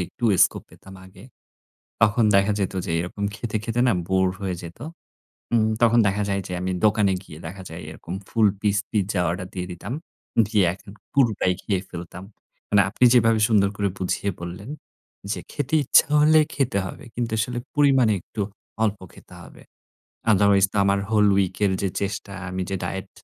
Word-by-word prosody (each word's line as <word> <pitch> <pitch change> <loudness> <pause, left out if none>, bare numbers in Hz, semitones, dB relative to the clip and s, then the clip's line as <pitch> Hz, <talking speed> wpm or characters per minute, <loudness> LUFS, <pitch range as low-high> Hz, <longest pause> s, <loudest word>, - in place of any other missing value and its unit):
একটু 120 - -7 0.2
স্কোপ - - -3
পেতাম 95 - -14
আগে। 95 0 -16 0.8
তখন 115 +1 +4
দেখা 100 +2 +4
যেত 95 -1 -1
যে 85 - -3
এরকম 90 +4 -5
খেতে, 110 -2 -5
খেতে 115 +1 -2
না - - +4 0.2
বোরড 95 -1 +2
হয়ে 95 -2 -2
যেত। 85 +3 -10 0.7
উম 110 -2 +3
তখন 120 0 +5
দেখা 100 +1 0
যায় 100 0 0
যে - - -7
আমি 95 - -2
দোকানে 105 -2 +3
গিয়ে 80 -5 -12
দেখা 95 +3 -8
যায় 80 +2 -8
এরকম 80 +2 -8
ফুল 115 -2 +3
পিস 105 -1 +1
পিজ্জা 100 -2 0
অর্ডার 90 +1 -3
দিয়ে 90 -1 -4
দিতাম। 90 +7 -7 0.5
দিয়ে 105 -2 +2
এখন 100 +2 -13 0.2
পুরোটাই 115 -9 +2
খেয়ে 95 -3 -1
ফেলতাম। 90 +1 -8 0.5
মানে 105 - +5
আপনি 115 - +1
যেভাবে 115 -2 +4
সুন্দর 100 -3 +4
করে 100 -1 0
বুঝিয়ে 95 +2 -1
বললেন, 90 +7 -7 0.6
যে - - -3
খেতে 145 +2 -2
ইচ্ছা - - +5
হলে 155 +1 +6
খেতে 125 -8 0
হবে। - - -9
কিন্তু 120 -2 -3
আসলে 120 +3 -1 0.2
পরিমাণে 135 -6 +4
একটু 105 - -8 0.4
অল্প 105 -2 0
খেতে - - -16
হবে। - - -15 0.7
আদারওয়াইজ 100 -1 +5
তো - - -11
আমার 100 0 +2
হোল 105 -2 +4
উইক 95 -2 +1
এর 100 - +2
যে 100 - 0
চেষ্টা, 100 0 -4 0.2
আমি 95 0 -3
যে 95 - -1
ডায়েট 95 +2 -4
100 Hz, 175 wpm, -23 LUFS, 95-110 Hz, 0.8 s, হলে